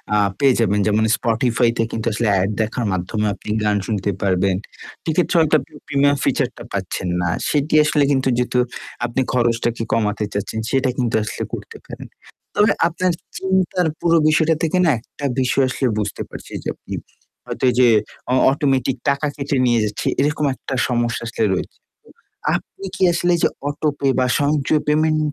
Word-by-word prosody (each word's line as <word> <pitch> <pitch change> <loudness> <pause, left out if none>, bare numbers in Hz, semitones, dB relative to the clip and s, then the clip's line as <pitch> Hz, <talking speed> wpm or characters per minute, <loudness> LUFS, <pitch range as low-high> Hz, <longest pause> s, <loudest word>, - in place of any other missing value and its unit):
আ - - +4 0.2
পেয়ে 135 -2 +5
যাবেন 105 -2 +2
যেমন 105 +1 +2
Spotify 120 0 +1
তে 115 - +2
কিন্তু 115 +1 -3
আসলে 115 +1 0
এড 95 - 0
দেখার 110 +2 -2
মাধ্যমে 95 +4 -2
আপনি 100 - -11
গান 105 -1 +2
শুনতে 105 -2 -1
পারবেন। 95 -1 +2 0.5
সেক্ষেত্রে 170 +3 0
হয়তো 155 -1 +3
আপনি - - -17
প্রিমিয়াম 140 0 +2
ফিচার - - +1
টা - - -8
পাচ্ছেন - - -3
না। 85 - 0 0.2
সেটি 150 +1 0
আসলে 150 -1 +2
কিন্তু 135 -1 +1
যেহেতু 125 0 +1 0.5
আপনি 120 +2 -1
খরচটাকে 120 -1 +1
কমাতে 105 -1 0
চাচ্ছেন। 100 +2 -3
সেটা 135 -1 +2
কিন্তু 120 -3 0
আসলে 110 - -4
করতে - - -7
পারেন। - - -9 0.5
তবে 210 0 +4 0.2
আপনার 180 +2 0 0.3
চিন্তার 190 -2 +1
পুরো 170 -1 +3
বিষয়টা 160 +1 +3
থেকে 165 +2 +1
না 160 - +5
একটা 140 +4 -9
বিষয় 130 +1 +2
আসলে 130 0 0
বুঝতে 105 -2 -3
পারছি - - -10
যে, - - -1
আপনি - - -10 0.5
হয়তো - - -3
এইযে 125 0 +4 0.5
অ - - +4 0.2
অটোমেটিক 135 -2 0
টাকা 140 +2 +1
কেটে 140 -1 -2
নিয়ে 120 -1 +3
যাচ্ছে 105 -1 -4
এরকম 150 +1 +1
একটা 135 - -7
সমস্যা 120 -1 -1
আসলে 115 -1 -2
রয়েছে। 90 - -4 0.7
তো - - -5
আপনি 195 - -12
কি - - -1
আসলে 175 +1 +2
যে - - +5 0.2
অটো-পে 145 -1 -1
বা 130 - +3
সঞ্চয় 145 +1 +1
পেমেন্ট 155 +1 +2
130 Hz, 170 wpm, -20 LUFS, 115-150 Hz, 0.7 s, পেয়ে